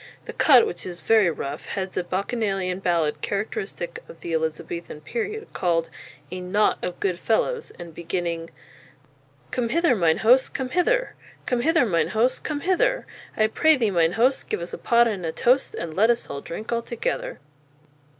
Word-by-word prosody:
The - - -7
cut, 260 -6 +6
which 175 - -5
is 175 -1 -6
very 215 +1 +4
rough, 145 -2 -5
heads 190 -1 -4
a 185 - 0
bacchanalian 195 -1 -2
ballad 165 -5 0
characteristic 425 - -4
of 485 - -13
the 170 - -4
Elizabethan 160 0 -3
period, 440 - -4
called 165 -2 0 0.4
"A 185 - -4
Knotte 200 +4 +1
of 180 - -4
Good 180 -3 -1
Fellows," 450 - 0
and 170 -2 -9
beginning: 170 0 -3 1.0
_Come 240 -2 -1
hither, 335 -2 +3
mine 165 -5 +3
host, 255 +3 +5
come 260 -2 -2
hither! - - +1 0.3
Come 245 -2 0
hither, 325 -1 +3
mine 170 -7 +1
host, 245 +3 +2
come 295 -2 -3
hither! - - +1 0.3
I 215 - +4
pray 315 +8 +4
thee, 225 -5 +1
mine 170 -2 +2
host, 250 +6 +1
Give - - -1
us 170 +1 -6
a - - -5
pot 235 0 +4
and 200 -5 -3
a 165 - -1
tost, 250 +11 +2
And 165 -2 -5
let 215 +7 +3
us 240 0 +1 0.2
drinke 215 +8 -6
all 235 0 +1
together. 235 0 -3
210 Hz, 175 wpm, -24 LUFS, 175-260 Hz, 1.0 s, cut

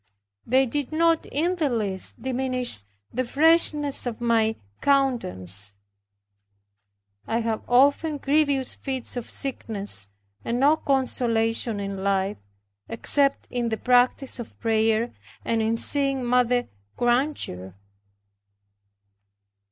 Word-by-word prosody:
They 260 +3 +4
did 285 +3 -3
not 330 +1 +2
in 345 +6 -1
the 310 -4 +1
least 205 -6 -2
diminish 255 - -1 0.3
the 255 - 0
freshness 295 0 +4
of 230 -2 -5
my 225 -2 +1 0.3
countenance. 100 - 0 1.5
I 230 +1 0
had 225 -1 -2
often 285 +5 +3
grievous 280 -2 +1
fits 265 -3 -5
of 245 -2 -5
sickness 205 - -2 0.3
and 235 +1 -2
no 290 +4 +5
consolation 235 -6 0
in 195 -1 -5
life, 195 0 0 0.5
except 275 +4 +1
in 240 -2 -1
the 220 - -2
practice 250 +2 +2
of 235 - -9
prayer, 225 +1 +1 0.3
and 230 -1 0
in 220 +1 +1
seeing 275 -1 +3
Mother 245 0 +2 0.3
Granger. 240 - -1
245 Hz, 105 wpm, -24 LUFS, 225-275 Hz, 1.5 s, no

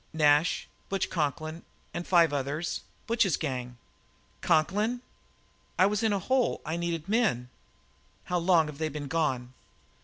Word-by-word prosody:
"Nash, 150 +1 +3 0.2
Butch 195 0 -1
Conklin, 155 0 -2 0.3
and 175 - -4
five 170 -3 +5
more. 145 +3 -2 0.4
Butch's 225 -7 +2
gang." 125 -5 -4 0.6
"Conklin!" 210 +10 +2 0.8
"I 185 - +6
was 205 +2 +1
in 220 -1 +2
a 200 - +2
hole; 255 +6 +1
I 160 - -2
needed 170 -1 -2
men." 200 - +1 0.7
"How 180 0 -1
long 170 -2 +4
have 150 -1 -8
they 160 -1 0
been 145 -1 -5
gone?" 135 -5 -1
165 Hz, 140 wpm, -29 LUFS, 145-190 Hz, 0.8 s, I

